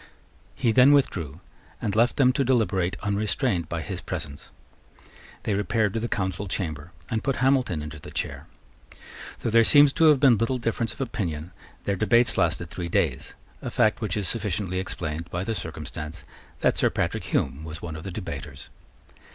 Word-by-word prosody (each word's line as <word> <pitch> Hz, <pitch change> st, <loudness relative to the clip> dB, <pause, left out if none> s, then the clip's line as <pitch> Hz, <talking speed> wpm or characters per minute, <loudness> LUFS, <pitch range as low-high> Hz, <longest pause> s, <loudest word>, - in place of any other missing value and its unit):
He 115 Hz, -, +2 dB
then 130 Hz, +4 st, +7 dB
withdrew, 85 Hz, -, 0 dB, 0.4 s
and 100 Hz, -, -2 dB
left 120 Hz, +2 st, +3 dB
them 130 Hz, -3 st, +4 dB
to 135 Hz, -, +1 dB
deliberate 100 Hz, -8 st, +1 dB
unrestrained 100 Hz, -, 0 dB
by 85 Hz, -1 st, -3 dB
his -, -, -5 dB
presence. 70 Hz, -1 st, -6 dB, 0.9 s
They 105 Hz, -, 0 dB
repaired 105 Hz, +1 st, +1 dB
to 115 Hz, -, -1 dB
the 115 Hz, -, -2 dB
Council 95 Hz, -2 st, -2 dB
chamber, 85 Hz, -4 st, -4 dB, 0.2 s
and 110 Hz, -1 st, -1 dB
put 135 Hz, -, 0 dB
Hamilton 130 Hz, -, +1 dB
into 75 Hz, 0 st, -8 dB
the -, -, -10 dB
chair. -, -, -4 dB, 0.9 s
Though 115 Hz, -, -1 dB
there 115 Hz, +1 st, +6 dB
seems 145 Hz, +3 st, +7 dB
to 165 Hz, -, +3 dB
have 150 Hz, -3 st, +6 dB
been 130 Hz, -5 st, +5 dB
little 115 Hz, +3 st, +1 dB
difference 115 Hz, -1 st, -1 dB
of -, -, -8 dB
opinion, 90 Hz, -, -3 dB, 0.3 s
their 100 Hz, -, 0 dB
debates 115 Hz, +5 st, +3 dB
lasted 85 Hz, -1 st, 0 dB
three 85 Hz, 0 st, -4 dB
days, -, -, -1 dB, 0.3 s
a -, -, -4 dB
fact 110 Hz, +1 st, +2 dB
which 105 Hz, -3 st, -1 dB
is 100 Hz, -3 st, +1 dB
sufficiently 100 Hz, -4 st, -1 dB
explained 85 Hz, -3 st, -4 dB
by 90 Hz, +1 st, -3 dB
the 115 Hz, -, -2 dB
circumstance 75 Hz, -6 st, -6 dB, 0.4 s
that -, -, +2 dB
Sir -, -, +4 dB
Patrick -, -, -2 dB
Hume 75 Hz, -, -1 dB
was 80 Hz, +1 st, -7 dB
one 80 Hz, -2 st, -5 dB
of 80 Hz, -, -7 dB
the -, -, -5 dB
debaters. 75 Hz, -7 st, -7 dB
100 Hz, 175 wpm, -25 LUFS, 85-120 Hz, 0.9 s, then